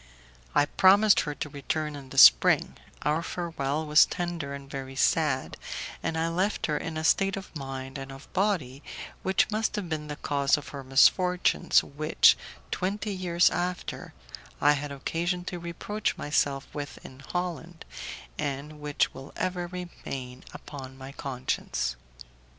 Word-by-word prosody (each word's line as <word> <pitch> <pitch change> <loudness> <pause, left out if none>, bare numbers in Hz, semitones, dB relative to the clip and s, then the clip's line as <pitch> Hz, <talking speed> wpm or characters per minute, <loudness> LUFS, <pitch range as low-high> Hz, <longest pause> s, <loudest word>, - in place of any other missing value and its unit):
I 145 - +5
promised 200 +6 +5
her 150 -2 -2
to 150 - -4
return 150 +2 -3
in 135 -2 -10
the - - -9
spring; 65 0 +7 0.3
our 150 +2 +1
farewell 160 -4 -2
was 150 0 +6
tender 170 -5 -3
and 140 0 -10
very 135 -1 -6
sad, 140 -1 +1 0.4
and 165 0 -2
I 165 +1 +1
left 185 +5 0
her 150 - 0
in 160 +1 -3
a 155 - -3
state 195 +4 +3
of 195 -3 -9
mind 135 -1 -6
and 135 0 -7
of 135 +1 -11
body 180 -10 0 0.4
which 190 +3 +2
must 220 +1 0
have 195 -5 -4
been 155 -2 -3
the 150 - -4
cause 140 0 +1
of 150 - -8
her 140 -2 -7
misfortunes, 180 +7 +4
which, 155 +3 +4 0.4
twenty 200 +3 -2
years 175 -2 +3
after, 180 0 -3 0.4
I 145 - +5
had 145 0 -1
occasion 170 +6 -2
to 180 -1 -4
reproach 170 +5 -3
myself 145 -2 0
with 145 -1 -5
in 130 - -11
Holland, 170 +4 -5 0.5
and 145 +2 -4
which 150 -1 0
will 135 +1 -10
ever 180 -1 -2
remain 135 -8 -7
upon 135 -2 -9
my 135 0 -9
conscience. 130 - -2
150 Hz, 150 wpm, -28 LUFS, 140-175 Hz, 0.5 s, spring